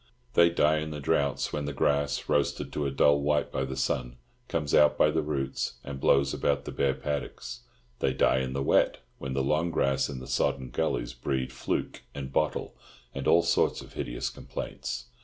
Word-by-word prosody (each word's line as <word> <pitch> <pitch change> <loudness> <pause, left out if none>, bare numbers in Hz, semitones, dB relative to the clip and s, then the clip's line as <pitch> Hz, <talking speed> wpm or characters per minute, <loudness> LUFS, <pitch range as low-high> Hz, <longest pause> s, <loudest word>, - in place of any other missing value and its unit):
They 85 0 +6
die 80 -2 +3
in 75 0 -4
the 75 -1 -5
droughts 70 -1 0
when 75 -1 -2
the 75 - -3
grass, 70 +1 +1
roasted - - 0
to 75 -1 -1
a - - 0
dull 70 +1 +4
white 75 0 +1
by 65 - -1
the 65 0 -5
sun, 60 -2 -1 0.3
comes 75 -3 -2
out 75 0 +5
by 75 - +4
the 80 +1 +1
roots 70 -3 -2
and 70 -1 -6
blows 70 +1 +3
about 70 - 0
the - - -5
bare 70 -1 +1
paddocks; 75 -2 -4 0.4
they 65 - +2
die 65 0 +3
in 65 0 -2
the 70 0 -1
wet, - - +3 0.2
when 65 -1 -4
the 70 0 0
long 75 +5 +1
grass 70 -4 +1
in 65 -3 -5
the 65 - -8
sodden 65 0 0
gullies - - -1
breeds 65 +1 -2
"fluke" - - -3
and 70 -1 -6
"bottle" 75 -2 0 0.4
and 70 0 -4
all 85 +1 +6
sorts 85 0 +2
of - - -13
hideous - - -3
complaints. 125 - -6
70 Hz, 195 wpm, -28 LUFS, 65-75 Hz, 0.4 s, They